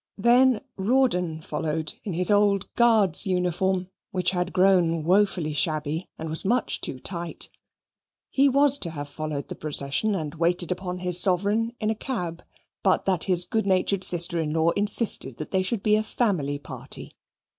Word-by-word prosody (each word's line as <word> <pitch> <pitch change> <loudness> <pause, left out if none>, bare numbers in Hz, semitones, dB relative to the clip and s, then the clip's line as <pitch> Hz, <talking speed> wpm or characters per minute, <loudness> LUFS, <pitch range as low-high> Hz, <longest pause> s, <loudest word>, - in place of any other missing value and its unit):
Then 240 +2 +3 0.2
Rawdon 190 -8 0
followed 155 +1 -3
in 195 - -5
his 180 +4 0
old 205 -1 +1
Guards' 220 -8 +3
uniform, 180 0 -1 0.2
which 185 -1 0
had 180 0 -2
grown 180 -4 +2
woefully 180 -3 +1
shabby, 155 +2 -1
and 160 - -6
was 160 0 0
much 235 +4 -1
too - - -3
tight. 170 +4 -6 0.8
He 275 +1 +3
was 280 +1 +4
to 170 - -2
have 145 -3 -7
followed 150 0 -5
the - - -6
procession 150 +7 -1
and 155 -5 -4
waited 175 +1 0
upon 180 0 -5
his 180 -1 +4
sovereign 205 +6 +1
in 215 0 -1
a - - -2
cab, 180 -9 -5 0.4
but - - +1
that 185 -3 +1
his 180 -2 +4
good 220 +2 -2
natured 190 0 +1
sister 170 -1 +5
in 150 -1 -3
law 165 +1 +2
insisted 205 - +1
that 155 - -7
they 190 - +1
should 195 +2 -2
be 210 0 +3
a - - +1
family 185 - -1
party. 145 - -8
180 Hz, 165 wpm, -24 LUFS, 160-205 Hz, 0.8 s, sister